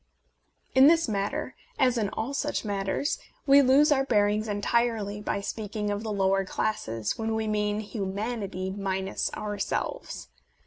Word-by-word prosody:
In 265 +1 +8
this 330 0 +4
matter, 200 -2 -2 0.2
as 255 -2 +3
in 215 -4 0
all 235 +7 -4
such 290 -3 -2
matters, 200 +7 -1 0.3
we 280 0 +7
lose 280 +3 +5
our 270 -2 +4
bearings 210 -3 +2
entirely 210 0 0
by 200 - -2
speaking 210 0 -3
of 205 0 -2
the 220 -1 -4
"lower 195 -1 +2
classes" 115 - -2
when 225 0 -1
we 220 0 -1
mean 210 0 0
hu 205 -2 -4
manity 195 -2 -3
minus 190 -1 -2
ourselves. 205 - -4
210 Hz, 145 wpm, -27 LUFS, 200-235 Hz, 0.3 s, In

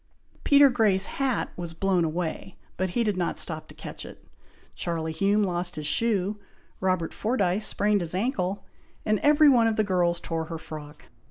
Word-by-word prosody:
Peter 285 0 +7
Grey's 205 -5 +2
hat 270 -3 -2
was 170 -2 -6
blown 185 -1 +1
away, 170 +3 -3 0.2
but 185 +1 -1
he 235 +7 0
did 210 -3 0
not 175 -2 -2
stop 155 -2 -1
to - - -14
catch - - -7
it. - - -12 0.5
Charlie 165 -2 -3
Hume 200 +6 +2
lost 175 -2 -1
his 155 -1 -5
shoe, 205 +3 0 0.4
Robert 185 -3 0
Fordyce 210 -3 0
sprained 205 -1 +1
his 170 0 0
ancle, 195 -3 -1 0.4
and 215 -1 +2
every 300 +1 +5
one 240 -5 +5
of 225 - +1
the 215 - +2
girls 175 -3 +1
tore 165 -1 -3
her 165 0 -6
frock. 150 -1 -10
185 Hz, 175 wpm, -26 LUFS, 170-215 Hz, 0.5 s, Peter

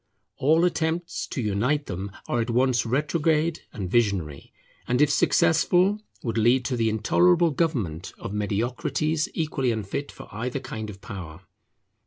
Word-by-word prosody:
All 160 +5 +4
attempts 165 0 -1
to 130 - -3
unite 125 +9 0
them 95 +2 -5 0.2
are 120 - 0
at 115 - -3
once 125 -1 +2
retrograde 150 +4 +1
and 100 -4 -5
visionary, 95 -9 0 0.4
and 125 +1 +1
if 150 -1 +4
successful 180 +6 +3 0.2
would 115 -2 -1
lead 125 +3 +3
to 130 - -1
the 115 -2 +1
intolerable 170 - +3
government 120 - -1
of - - -6
mediocrities 125 +9 -1
equally 140 -6 0
unfit 110 +6 -4
for - - -12
either 125 +5 -3
kind 110 -5 -6
of 100 -1 -10
power. 90 -6 -8
125 Hz, 145 wpm, -25 LUFS, 105-155 Hz, 0.4 s, All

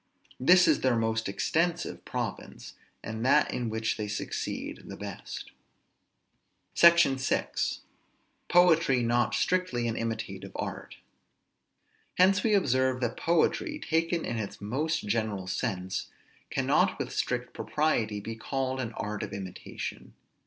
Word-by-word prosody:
This 180 +7 +6
is - - +4
their 130 -2 +3
most 110 -1 0
extensive 165 - -1
province, - - -5 0.3
and 110 +1 -4
that 140 +3 +4
in 120 -2 -2
which 110 0 -1
they 105 -1 -3
succeed 105 0 -4
the - - -8
best. - - -7 1.2
SECTION 170 -5 +6
VI. 130 - 0 1.0
POETRY 165 -8 +5
NOT 120 0 +2
STRICTLY 180 -11 0
AN 115 - -1
IMITATIVE 115 -1 -4
ART. - - -5 1.2
Hence 190 +2 +5
we 225 - +1
may 210 - +4
observe 130 -7 +2
that 120 -1 -1
poetry, 300 - +1
taken 165 - 0
in 115 - -2
its 100 -2 -5
most 150 +10 -1
general 105 -2 -1
sense, 95 0 -2 0.4
cannot - - +2
with - - -4
strict - - -2
propriety 115 -9 0
be 110 +2 -6
called 130 +3 -2
an 115 -2 -4
art 105 -2 -4
of - - -5
imitation. 95 -2 -7
125 Hz, 130 wpm, -29 LUFS, 110-165 Hz, 1.2 s, This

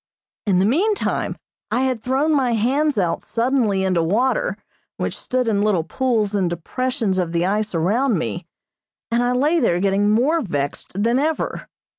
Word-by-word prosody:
In 190 -3 +3
the 185 - +3
meantime 385 - 0 0.3
I 250 - 0
had 260 -4 0
thrown 270 +6 +1
my 260 -5 +2
hands 270 +6 +1
out 175 -4 0
suddenly 230 -5 0
into 185 -3 +1
water 255 - +1 0.4
which - - -2
stood 250 -1 -2
in 205 -3 +1
little 205 -6 +2
pools 220 +2 0
in 195 -3 +1
depressions 200 - -2
of 170 -2 -2
the 170 +1 +1
ice 210 0 -1
around 215 +8 +1
me, 115 -10 -4 0.6
and 235 +1 +2
I 245 0 +1
lay 295 +7 +2
there 175 - +2
getting 200 +2 +2
more 270 +10 +2
vexed 160 - -3
than 235 +3 +2
ever. 310 +2 -2
225 Hz, 165 wpm, -21 LUFS, 190-260 Hz, 0.6 s, In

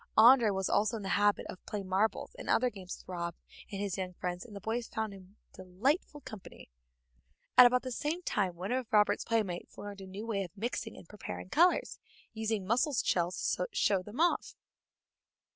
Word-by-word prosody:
André 230 0 +8
was 190 -1 -1
also 215 +3 +2
in 210 - -7
the 195 - -3
habit 205 0 +2
of 185 - -9
playing 200 -2 -4
marbles 195 +4 0
and - - -7
other 250 +1 +3
games 190 -3 -8
with - - -18
Rob 170 -2 -4 0.4
and 195 - -4
his 200 -2 -2
young 185 -1 -3
friends, 180 0 -4
and 220 -4 -12
the - - -5
boys 225 +4 -2
found 220 -2 -3
him 190 +1 -14 0.2
delightful 260 - -1
company. 210 - -11 0.8
At 250 - +11
about 250 0 +1
the 255 - -4
same 305 +8 -2
time 190 - 0
one 185 +5 -5
of 255 -2 -2
Robert's 210 -1 +4
playmates 210 -6 -2
learned 205 -1 -7
a 190 - -9
new 200 +4 -7
way 215 -4 -1
of 180 +2 -11
mixing 225 +1 -3
and - - -13
preparing 90 - -7
colors, 360 - +3 0.3
using 220 -3 -2
mussel 250 - +2
shells 180 -7 +1
to 180 - -1
show 195 -3 +2
them 210 +8 -9
off. 345 +1 +1
205 Hz, 195 wpm, -32 LUFS, 185-230 Hz, 0.8 s, At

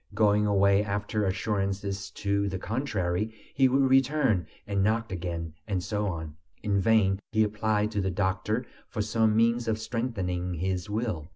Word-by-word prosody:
Going 105 -1 +3
away 100 0 +4
after 105 +1 -1
assurances 100 0 -2
to 100 0 -1
the 95 - -3
contrary, 110 -3 -2 0.2
he 135 -1 +4
would 135 +2 +3
return 135 - +3 0.2
and 100 -1 0
knock 115 +1 +1
again, 85 -3 -4
and 95 -4 -1
so 105 +1 -1
on. 80 -4 -5 0.3
In 100 -2 +1
vain 95 -2 +3
he 110 0 +4
applied 105 0 0
to 105 -2 0
the 95 - 0
doctor 95 +5 -1 0.2
for 110 -3 -2
some 110 0 +2
means 115 +1 +2
of 110 -1 +1
strengthening 95 -7 -2
his 90 +3 -2
will. 105 -8 -2
105 Hz, 160 wpm, -28 LUFS, 95-110 Hz, 0.3 s, away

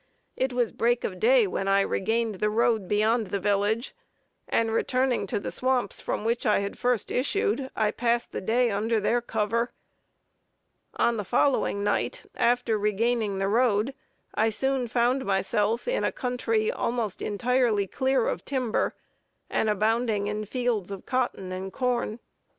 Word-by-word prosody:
It 260 0 0
was 245 -2 0
break 240 +1 +1
of - - -4
day 480 0 +5
when 195 - -2
I 195 0 +4
regained 220 +1 -1
the 210 - +2
road 220 -2 +1
beyond 215 +2 +2
the 200 +2 -2
village, 205 +5 0 0.5
and 225 -1 +1
returning 250 -1 +1
to - - -1
the - - -5
swamps 255 -4 -1
from 210 - -3
which 230 +1 0
I 210 - +3
had 200 0 -3
first 245 -4 0
issued, 285 - 0
I 215 -1 +1
passed 235 0 0
the - - -4
day 235 +4 +2
under 220 +3 +1
their 240 +4 +1
cover. 230 +1 -1 1.2
On 235 -1 +2
the 210 - -2
following 200 -2 +1
night, - - -1
after 240 -2 +1
regaining 210 0 0
the 195 0 0
road, 225 +2 +2 0.4
I 220 +1 +2
soon 265 +3 0
found 245 +3 +1
myself 205 +3 0
in - - 0
a - - +1
country 230 -3 0
almost 230 -5 -2
entirely 230 -1 +1
clear 260 +4 +1
of - - -2
timber, 255 -5 -1 0.6
and 220 - +1
abounding 215 0 +1
in 210 +1 -3
fields 235 -4 -1
of 195 -2 -7
cotton 245 -7 -1
and 190 +1 -5
corn. 245 -1 -1
230 Hz, 155 wpm, -27 LUFS, 210-245 Hz, 1.2 s, day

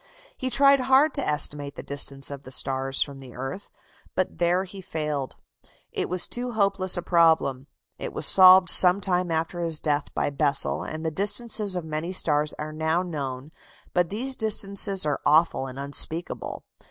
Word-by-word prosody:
He 260 - -4
tried 275 +1 +4
hard 265 +3 +3
to - - -2
estimate 145 -1 0
the - - -9
distance 140 -1 0
of 140 -1 -8
the 130 - -13
stars 135 +1 0
from 140 -1 -11
the 130 -2 -13
earth, 135 +10 -7 0.5
but 185 -2 -3
there 175 +2 +1
he 195 +1 -11
failed: 150 -6 -5 0.6
it - - -4
was 180 0 +2
too 245 0 -5
hopeless 195 -3 +1
a 175 - -4
problem. 160 -7 +1 0.3
It - - -5
was - - -1
solved 185 -1 +7
some 180 +1 +5
time 180 -2 -1
after 165 +2 -3
his 165 -2 +1
death 145 -2 -2
by - - -1
Bessel, 140 -1 0
and 155 +1 -7
the 160 - -1
distances 205 +2 +2
of 175 -3 -4
many 155 +3 -5
stars 150 -4 +1
are 155 0 -7
now 160 +3 -1
known 140 -4 -6 0.4
but 175 -2 0
these 255 +6 -3
distances 200 -4 0
are 150 - -2
awful 155 -3 +2
and 130 0 -10
unspeakable. 145 +4 -1
165 Hz, 175 wpm, -24 LUFS, 145-190 Hz, 0.6 s, solved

